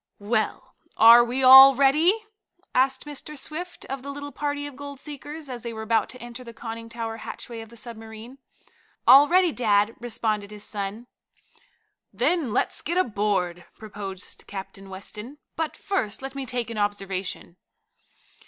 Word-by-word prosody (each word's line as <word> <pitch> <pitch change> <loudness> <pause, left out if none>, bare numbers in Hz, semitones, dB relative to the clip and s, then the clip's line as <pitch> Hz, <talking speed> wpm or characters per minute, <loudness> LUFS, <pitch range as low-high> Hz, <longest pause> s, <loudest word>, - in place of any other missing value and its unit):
"Well, 215 +2 -2 0.2
are 230 +2 +9
we 250 +3 -2
all 265 +1 +10
ready?" 315 - +3 0.5
asked 265 +3 +1
Mr. 295 +1 -6
Swift 340 +6 -6
of 270 0 -5
the 280 - -8
little 285 0 -6
party 290 +1 -3
of 290 -2 -8
gold 285 0 -9
seekers, 295 +1 -8
as 250 -2 -7
they 235 0 -6
were 220 0 -6
about 220 -1 +1
to 255 - -9
enter 240 +1 -9
the 235 -2 -11
conning 230 0 -7
tower 230 -1 -5
hatchway 230 +1 -8
of 225 - -11
the 235 - -14
submarine. 225 +3 -9 0.7
"All 275 +4 +9
ready, 360 0 +4
dad," 210 -4 +2
responded 215 -3 -2
his 210 -1 -10
son. 205 +3 -5 1.1
"Then 330 -9 0
let's - - 0
get 345 +4 -2
aboard," 200 - 0
proposed 200 -3 -8
Captain 195 0 -8
Weston. 210 +7 -7 0.2
"But 320 -1 -3
first 265 - -2
let 270 0 -5
me 275 -1 -5
take 240 -2 -2
an 220 - -4
observation." 195 -3 -3
235 Hz, 155 wpm, -25 LUFS, 210-280 Hz, 1.1 s, all